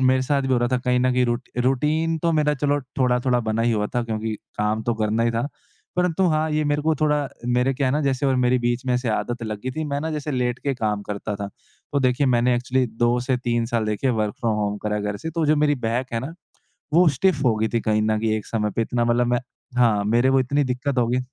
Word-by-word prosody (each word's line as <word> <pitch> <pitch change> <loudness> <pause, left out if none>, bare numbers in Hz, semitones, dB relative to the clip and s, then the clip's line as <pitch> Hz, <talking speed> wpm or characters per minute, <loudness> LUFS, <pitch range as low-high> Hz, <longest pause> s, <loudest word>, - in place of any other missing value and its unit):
मेरे 130 0 +3
साथ 140 +1 +1
भी 135 -1 0
हो 125 - +3
रहा 120 0 +1
था, 125 - +3
कहीं 125 0 +1
न 130 0 +2
कहीं 125 0 +2
रूट 120 0 -2 0.2
रूटीन 155 +5 +1
तो 165 +1 +1
मेरा, 150 -1 +2
चलो, 145 +1 0 0.2
थोड़ा-थोड़ा 125 -1 +2
बना 110 0 -1
ही 120 0 +2
हुआ 105 -1 0
था, 120 - +1
क्योंकि 110 -1 -3 0.2
काम 105 +1 0
तो 120 +1 0
करना 110 +1 0
ही 115 - +2
था। 115 +4 -1 0.5
परंतु 180 +1 +2
हाँ, 155 0 +1
ये 155 0 +1
मेरे 145 0 0
को 160 +1 +2
थोड़ा 150 -2 +1 0.2
मेरे 125 +2 +2
क्या 135 +1 0
है 130 - +1
ना, 150 - +1
जैसे 135 0 0
और 135 -1 +2
मेरी 125 0 +3
बीच 120 +1 -1
में 125 - +1
ऐसे 125 0 -1
आदत 120 +2 -2
लग 105 -2 -4
गई 130 - -2
थी, 155 +4 -4
मैं 140 -1 -2
ना, 160 +2 -3
जैसे 150 -1 -3
लेट 125 -2 -1
के 140 -1 -2
काम 105 -4 -1
करता 105 +1 -4
था। 100 0 -5 0.4
तो 140 - +2
देखिए, 130 +2 +2
मैंने 125 0 +3
एक्चुअली 125 +1 0
2 120 +2 +1
से 130 +1 0
3 120 -1 -1
साल, 115 -2 -1
देखिए, 110 +5 0
वर्क 110 -3 -1
फ्रॉम 115 -2 +1
होम 105 0 -1
करा 105 0 0
है 105 - -2
घर 105 0 -2
से, 160 - -5
तो 165 -1 -1
जो 155 +1 +4
मेरी 150 0 +3
बैक 120 +3 -2
है 115 - -1
ना, 135 +6 -6 0.6
वो 175 +1 +6
स्टिफ़ 150 +3 +1
हो 115 - +4
गई 110 +1 0
थी 115 - 0
कहीं 110 -1 +1
न 110 0 +1
कहीं 110 0 0
एक 105 - -6
समय 105 -2 -1
पे। 115 - +2
इतना 120 +1 0
मतलब 120 +1 +2
मैं 120 0 +1 0.4
हाँ, 110 -4 +3
मेरे 120 +5 +3
वो 135 0 +4
इतनी 140 +3 +1
दिक्कत 130 +1 -2
हो 120 - +3
गई 125 +1 +1
125 Hz, 270 wpm, -23 LUFS, 115-140 Hz, 0.6 s, वो